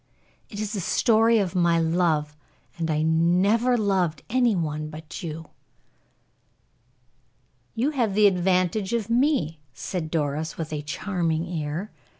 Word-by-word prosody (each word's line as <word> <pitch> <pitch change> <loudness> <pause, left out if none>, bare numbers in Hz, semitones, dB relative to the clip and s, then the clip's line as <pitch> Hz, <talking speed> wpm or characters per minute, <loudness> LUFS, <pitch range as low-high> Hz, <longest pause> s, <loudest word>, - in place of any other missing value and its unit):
It 205 - -8
is 215 0 -3
the 205 - -2
story 225 +5 +3
of 195 -5 0
my 170 -2 +3
love, 160 -3 +1 0.4
and 165 -1 -1
I 155 0 +1
never 185 +10 +3
loved 190 -7 0
any 245 -3 +3
one 155 -3 -3
but 155 0 -9
you." 160 -1 -6 2.3
"You 255 +7 +1
have 235 -9 0
the 210 0 +5
advantage 185 +2 +2
of 230 -1 -1
me," 240 - +1 0.2
said 170 -4 -4
Doris, 155 0 -2
with 160 -1 -5
a 150 - -3
charming 165 +1 -2
air. 165 +4 -4
175 Hz, 135 wpm, -25 LUFS, 160-215 Hz, 2.3 s, the